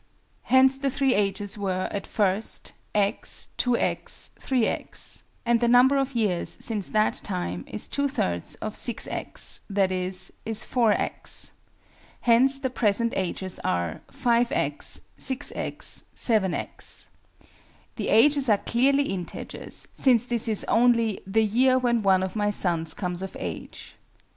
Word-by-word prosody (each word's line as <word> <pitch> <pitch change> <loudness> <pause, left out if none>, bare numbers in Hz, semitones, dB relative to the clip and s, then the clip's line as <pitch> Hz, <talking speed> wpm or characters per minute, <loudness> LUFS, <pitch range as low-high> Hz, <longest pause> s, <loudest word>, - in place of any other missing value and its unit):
Hence 265 +1 +5
the 275 0 0
three 270 -1 +2
ages 205 0 -1
were, 185 -2 -1
at 200 - -4
first, 205 0 -1 0.2
x, 205 +1 0
2_x_, 245 -1 +2
3_x_; 255 -4 -1 0.2
and 235 0 +3
the 240 - +3
number 250 +3 +6
of 275 -1 -1
years, 205 -7 0
since 215 -5 -3
that 215 0 +2
time 90 - -3
is 105 - -4
two 280 0 0
thirds 90 - -2
of 215 - -5
6_x_, 240 -1 -1 0.2
i.e. 185 -2 +2
is 185 0 -4 0.3
4_x_. 230 -4 0 0.7
Hence 260 +3 +4
the 260 -2 -2
present 230 0 +1
ages 185 0 -3
are 85 -2 -1
5_x_, 235 0 0 0.2
6_x_, 265 +1 -2
7_x_. 210 -6 -1 0.9
The - - -2
ages 275 +3 +5
are 210 - +5
clearly 275 +7 +2
integers, 190 -9 -5
since 245 -3 +3
this 235 -2 0
is 215 -2 +1
only 230 -3 +3
"the 220 +3 +2
year 255 +5 +3
when 240 -2 +1
one 190 -2 +3
of 190 - -4
my 205 -1 +1
sons 165 -5 0
comes 180 -2 -3
of 190 0 -6
age." 85 -4 -7
220 Hz, 130 wpm, -26 LUFS, 190-250 Hz, 0.9 s, number